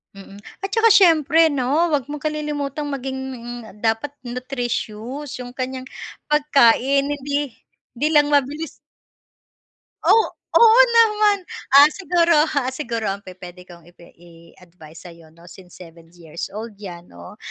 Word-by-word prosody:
Mm 195 Hz, +1 st, -13 dB, 0.2 s
at -, -, -1 dB
saka 455 Hz, 0 st, +4 dB
syempre 330 Hz, -5 st, +5 dB
'no 285 Hz, +3 st, 0 dB
'wag 295 Hz, -5 st, 0 dB
mong 295 Hz, -, -6 dB
kalilimutang 300 Hz, -1 st, -4 dB
maging 265 Hz, -1 st, -5 dB, 0.6 s
dapat 225 Hz, +5 st, -1 dB, 0.2 s
nutritious 250 Hz, +1 st, -5 dB
yung 245 Hz, 0 st, -9 dB
kanyang 260 Hz, 0 st, -5 dB, 0.4 s
pagkain 280 Hz, -2 st, +3 dB
hindi 285 Hz, -2 st, -4 dB, 0.4 s
'di 285 Hz, +6 st, 0 dB
lang 295 Hz, -2 st, +4 dB
mabilis. 290 Hz, +2 st, 0 dB, 1.3 s
Oh, 450 Hz, -, +4 dB, 0.3 s
oo 460 Hz, +1 st, +6 dB, 0.2 s
naman 425 Hz, -2 st, +4 dB, 0.4 s
ah 285 Hz, -, +10 dB
,siguro, 350 Hz, -3 st, +1 dB, 0.2 s
ah, 260 Hz, -1 st, -1 dB
siguro 235 Hz, -5 st, -4 dB
ang 195 Hz, 0 st, -3 dB
pupwede 180 Hz, -1 st, -12 dB
kong 170 Hz, -2 st, -15 dB
ipi 175 Hz, 0 st, -18 dB
iadvice 170 Hz, -1 st, -17 dB
sa'yo 165 Hz, -2 st, -16 dB
'no 170 Hz, +2 st, -20 dB
since 180 Hz, 0 st, -15 dB
7 165 Hz, -2 st, -15 dB
years 165 Hz, -1 st, -8 dB
old 220 Hz, +2 st, -8 dB
'yan 175 Hz, -3 st, -9 dB
'no 85 Hz, -, -14 dB
260 Hz, 130 wpm, -20 LUFS, 185-300 Hz, 1.3 s, ah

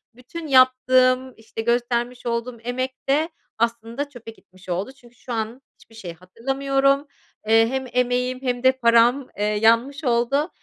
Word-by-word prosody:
Bütün 305 Hz, +7 st, -9 dB
yaptığım, 255 Hz, -1 st, +4 dB
işte, 225 Hz, 0 st, -7 dB
göstermiş 240 Hz, +1 st, -1 dB
olduğum 235 Hz, +1 st, -3 dB
emek 255 Hz, +2 st, -3 dB
de 310 Hz, +4 st, +2 dB, 0.3 s
aslında 235 Hz, +4 st, -2 dB
çöpe 240 Hz, -4 st, -11 dB
gitmiş 185 Hz, -3 st, -19 dB
oldu 185 Hz, +7 st, -2 dB
çünkü 245 Hz, -3 st, -21 dB
şu 245 Hz, +1 st, -8 dB
an 225 Hz, +3 st, -4 dB
hiçbir 225 Hz, -, -21 dB
şey 180 Hz, -6 st, -8 dB
hatırlamıyorum. 270 Hz, -, 0 dB, 0.4 s
Eee, 225 Hz, 0 st, +5 dB
hem 265 Hz, 0 st, -3 dB
emeğim 250 Hz, +1 st, 0 dB
hem 250 Hz, -2 st, -2 dB
de 260 Hz, -, +6 dB
param, 245 Hz, +1 st, +3 dB
eee, 205 Hz, -, -2 dB
yanmış 230 Hz, +7 st, +2 dB
oldu. 260 Hz, +6 st, +1 dB
245 Hz, 145 wpm, -22 LUFS, 230-260 Hz, 0.4 s, de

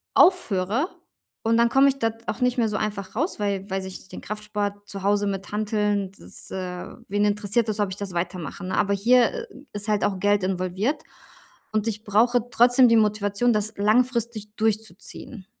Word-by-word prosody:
aufhöre 230 Hz, -, +3 dB, 0.6 s
und 230 Hz, +1 st, +3 dB
dann 235 Hz, 0 st, +4 dB
komme 270 Hz, +3 st, +5 dB
ich 275 Hz, -, -1 dB
dort 225 Hz, 0 st, -2 dB
auch -, -, -3 dB
nicht 250 Hz, 0 st, +2 dB
mehr 225 Hz, -2 st, +2 dB
so 210 Hz, -, -2 dB
einfach 205 Hz, -2 st, -4 dB
raus. 310 Hz, -, -1 dB
Weil 200 Hz, -2 st, -1 dB
weil 190 Hz, 0 st, -1 dB
sich 190 Hz, 0 st, -9 dB
den -, -, -9 dB
Kraftsport 205 Hz, -1 st, -4 dB
zu 195 Hz, -, -6 dB
Hause 205 Hz, +1 st, +2 dB
mit 195 Hz, 0 st, -4 dB
Hanteln, 210 Hz, -2 st, 0 dB
das -, -, -11 dB
äh, 180 Hz, -1 st, -5 dB, 0.2 s
wen 205 Hz, +1 st, +1 dB
interessiert 210 Hz, +2 st, +1 dB
das, 215 Hz, 0 st, -2 dB
ob 205 Hz, -2 st, +1 dB
ich 190 Hz, -, -6 dB
das 200 Hz, -2 st, -5 dB
weitermache, 170 Hz, -2 st, -4 dB
ne, 185 Hz, -, -2 dB
aber 200 Hz, -, +2 dB
hier 250 Hz, -, +3 dB, 0.3 s
ist 205 Hz, +1 st, -4 dB
halt 210 Hz, -1 st, +1 dB
auch 195 Hz, -2 st, -1 dB
Geld 205 Hz, 0 st, +2 dB
involviert 190 Hz, -, -1 dB, 0.7 s
und 215 Hz, -1 st, +1 dB
ich 215 Hz, -1 st, -3 dB
brauche 235 Hz, +3 st, +2 dB
trotzdem 245 Hz, +2 st, +6 dB
die 230 Hz, -, +5 dB
Motivation, 210 Hz, +2 st, +2 dB
das 215 Hz, 0 st, 0 dB
langfristig 220 Hz, 0 st, +1 dB
durchzuziehen. 220 Hz, -1 st, -3 dB
210 Hz, 180 wpm, -24 LUFS, 200-230 Hz, 0.7 s, trotzdem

